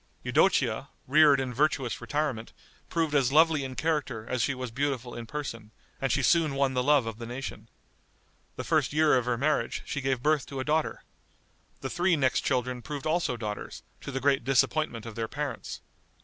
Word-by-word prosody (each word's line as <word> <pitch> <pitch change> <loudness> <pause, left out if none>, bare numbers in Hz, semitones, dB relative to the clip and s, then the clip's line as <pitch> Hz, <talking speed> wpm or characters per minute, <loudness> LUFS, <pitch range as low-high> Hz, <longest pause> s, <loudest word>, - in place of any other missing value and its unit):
Eudocia, - - +2 0.2
reared 145 0 +6
in 130 -2 -2
virtuous 135 -3 0
retirement, 145 -7 -2 0.4
proved 160 -3 0
as 135 -3 +3
lovely 155 -1 +4
in 130 -1 -6
character 140 -9 -1
as 125 - -1
she 135 +3 +1
was 125 -2 -5
beautiful 130 -1 -2
in 115 -1 -7
person, 115 -6 -6 0.3
and 135 - 0
she 140 - +1
soon 160 -1 +3
won 135 -1 +1
the 125 - +1
love 145 -1 +4
of 115 0 -6
the 115 - -6
nation. 125 +3 -7 0.9
The - - -5
first - - +1
year 155 -1 +4
of 125 -2 +1
her 125 -1 0
marriage, 150 +5 0
she 140 - -3
gave 130 -2 -1
birth 150 -2 +2
to 135 - -6
a - - -1
daughter. 155 +1 0 0.8
The 135 - -3
three 175 0 +2
next 135 -4 +2
children 125 -1 -1
proved 145 +1 -6
also 155 -6 0
daughters, 105 -2 -6 0.2
to - - -6
the 135 - -2
great 135 0 +2
disappointment 135 -2 +1
of 115 - -7
their 115 +1 -3
parents. 140 -1 -5
135 Hz, 190 wpm, -28 LUFS, 125-150 Hz, 0.9 s, reared